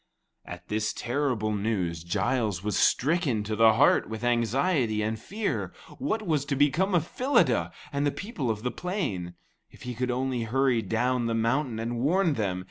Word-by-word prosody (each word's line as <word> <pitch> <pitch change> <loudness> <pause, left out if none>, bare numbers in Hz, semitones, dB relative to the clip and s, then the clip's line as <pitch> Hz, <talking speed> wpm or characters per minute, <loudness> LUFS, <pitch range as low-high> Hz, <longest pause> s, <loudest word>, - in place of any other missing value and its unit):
At 90 0 -9
this 110 0 -1
terrible 120 -4 -1
news, 95 -6 -1
Giles 100 +1 -1
was 105 0 -1
stricken 140 -6 +2
to 110 +1 -3
the 110 0 +6
heart 130 +6 +4
with 110 +1 -6
anxiety 120 - +1
and 110 +1 -2
fear. 205 - -3 0.3
What 225 -5 -1
was 155 -5 +1
to 145 -1 -1
become 155 +8 +2
of 165 -2 +2
Phyllida 165 - +2 0.2
and 140 0 0
the 145 - +3
people 200 - -4
of 110 -1 -2
the 125 - -1
plain? 115 - -3 0.3
If - - -16
he 125 - -4
could 125 +2 -2
only 125 0 -1
hurry 130 0 +2
down 120 +3 0
the 115 - 0
mountain 115 +2 0
and 115 +1 -3
warn 170 +5 +2
them! 100 -7 -1
120 Hz, 175 wpm, -27 LUFS, 110-145 Hz, 0.3 s, the